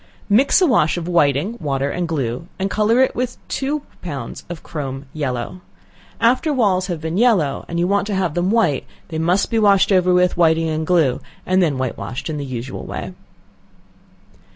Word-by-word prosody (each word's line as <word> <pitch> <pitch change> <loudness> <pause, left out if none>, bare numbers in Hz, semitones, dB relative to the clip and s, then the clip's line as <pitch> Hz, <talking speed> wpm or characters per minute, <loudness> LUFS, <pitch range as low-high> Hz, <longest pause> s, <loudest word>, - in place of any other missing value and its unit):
Mix 250 - +4
a - - +6
wash 195 - +2
of 170 -1 -4
whiting, 170 - +1
water 140 -2 -1
and 175 -1 -2
glue, 135 -1 -3
and 195 +1 -2
color 220 +4 +3
it 260 - +3
with 250 0 -2
two 285 +2 -2 0.2
pounds 140 -9 -6
of 175 -2 -7
chrome 135 -3 -5
yellow. 135 +3 -3 0.6
After 250 +7 +2
walls 195 -9 +2
have 175 -4 -3
been 160 +4 -2
yellow, 195 - +2
and 170 - -4
you 170 - +2
want 200 +1 +1
to 205 - -2
have 185 -5 0
them 175 +2 0
white, 205 - +2 0.2
they 160 -2 -3
must 180 +7 +1
be 225 - +2
washed 200 -2 +4
over 185 -1 +4
with 180 0 +3
whiting 165 -1 +3
and 155 0 -2
glue, 165 -8 +2 0.2
and 185 +1 +2
then 155 -6 +1
white 130 -2 -3
washed 120 +10 -5
in 150 - -3
the 145 - -4
usual 130 0 -6
way. - - -6
175 Hz, 190 wpm, -20 LUFS, 145-200 Hz, 0.6 s, a